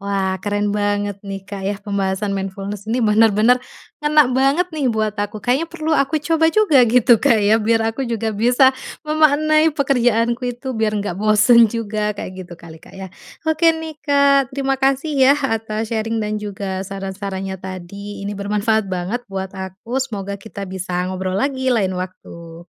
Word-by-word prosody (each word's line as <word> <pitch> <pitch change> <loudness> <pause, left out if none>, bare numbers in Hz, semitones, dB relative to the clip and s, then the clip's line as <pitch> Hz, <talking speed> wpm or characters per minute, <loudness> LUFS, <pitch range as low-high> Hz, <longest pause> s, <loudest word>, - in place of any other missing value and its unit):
Wah 195 -1 -1
keren 205 +2 -1
banget 205 -1 -1
nih 195 -1 -6
Kak 195 0 -8
ya 205 - 0
pembahasan 200 0 -2
mindfulness 195 +1 -5
ini 235 +2 0
bener-bener, 220 +2 +4 0.4
ngena 300 -3 +3
banget 275 +8 +2
nih 300 -4 -2
buat 215 -2 0
aku 205 +1 -4
kayaknya 265 +7 +1
perlu 320 -1 -4
aku 300 0 +1
coba 320 0 +2
juga 420 -10 +4
gitu 240 0 +5
Kak 230 - +3
ya 215 +1 +3
biar 225 +1 +1
aku 260 +3 -4
juga 225 -1 -2
bisa 245 +5 +4 0.3
memaknai 310 0 +3
pekerjaanku 245 -3 +1
itu 260 +2 -6
biar 220 -3 -1
nggak 185 -3 -4
bosan 215 +3 +5
juga 210 -1 -2
kayak 200 - -6 0.2
gitu 175 - -10
kali 165 -1 -13
Kak - - -17
ya. 190 -1 -8 0.3
Oke 320 +1 +3
nih 320 -1 -7
Kak 280 -3 +2
terima 270 -1 -1
kasih 270 +3 +1
ya 265 +2 +6
atas 225 -5 -2
sharing 225 0 -1
dan 210 0 -2
juga 195 -2 -5
saran-sarannya 195 -1 -5
tadi 190 +2 -8
ini 200 0 -5
bermanfaat 210 +1 0
banget 185 +6 -4
buat 190 -1 -5
aku 190 +6 -5
semoga 200 -6 -4
kita 200 0 -9
bisa 185 -1 -3
ngobrol 185 0 -3
lagi 260 +3 0
lain 195 -5 +1
waktu. 170 -2 -9
215 Hz, 165 wpm, -19 LUFS, 195-265 Hz, 0.4 s, ya